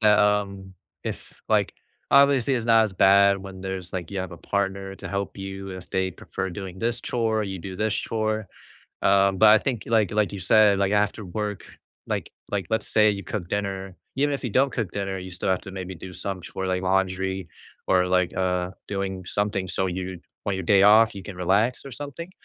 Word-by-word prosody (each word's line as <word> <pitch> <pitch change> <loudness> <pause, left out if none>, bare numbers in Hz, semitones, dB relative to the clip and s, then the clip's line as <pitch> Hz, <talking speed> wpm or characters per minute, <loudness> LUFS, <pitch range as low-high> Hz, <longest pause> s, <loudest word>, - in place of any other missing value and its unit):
that, 105 -1 +5
um, 100 -2 +1 0.3
if, - - -7
like - - +2 0.4
obviously 140 -2 +5
it's 120 -2 -2
not 115 -1 +6
as 105 - -3
bad 100 +1 +5
when 95 -1 -9
there's 95 -2 -5
like, 90 -2 -4
you 100 - -3
have 95 -2 -4
a - - -8
partner 95 +1 -2
to - - -7
help 100 0 -3
you 95 0 -6
if 95 -1 -8
they 95 0 0
prefer 95 +2 -5
doing 95 -1 -7
this 115 +2 0
chore, 110 -3 0
you 95 -1 -5
do 95 +2 -7
this 110 0 0
chore, 110 -1 -1 0.6
um, 95 -1 +4
but 110 - +7
I 110 0 +8
think 120 -2 -2
like 110 -5 +2
like 105 -1 +1
you 100 - -5
said, 100 +2 +5
like 100 +1 +1
after 105 +1 +1
work, 105 +2 -4 0.4
like - - -3 0.2
like, 95 -4 -1
let's 110 - 0
say 105 -1 +4
you 100 -1 -4
cook 90 -5 -4
dinner, 95 -2 -3 0.2
even 145 +2 +1
if 140 - -3
you 120 - -1
don't 135 +5 +3
cook 110 -8 -3
dinner, 95 -1 -3
you 95 - -7
still 90 +1 -3
have 95 -1 +2
to 95 - -9
maybe 95 -1 -6
do 90 +2 -9
some 95 +1 -4
chore 95 +2 -5
like 90 0 0
laundry 95 -1 0 0.4
or 90 -1 +4
like, 90 -1 +2
uh, 90 -1 0 0.2
doing 95 -2 -3
something 100 -2 -1
so 95 - 0
you 90 -1 -4 0.3
on 100 - +1
your 95 - -3
day 100 +2 +5
off 110 +1 +6
you 95 - -6
can 100 - -7
relax 100 +9 +1
or 140 - -8
something, 145 +7 -7
100 Hz, 210 wpm, -25 LUFS, 95-105 Hz, 0.6 s, I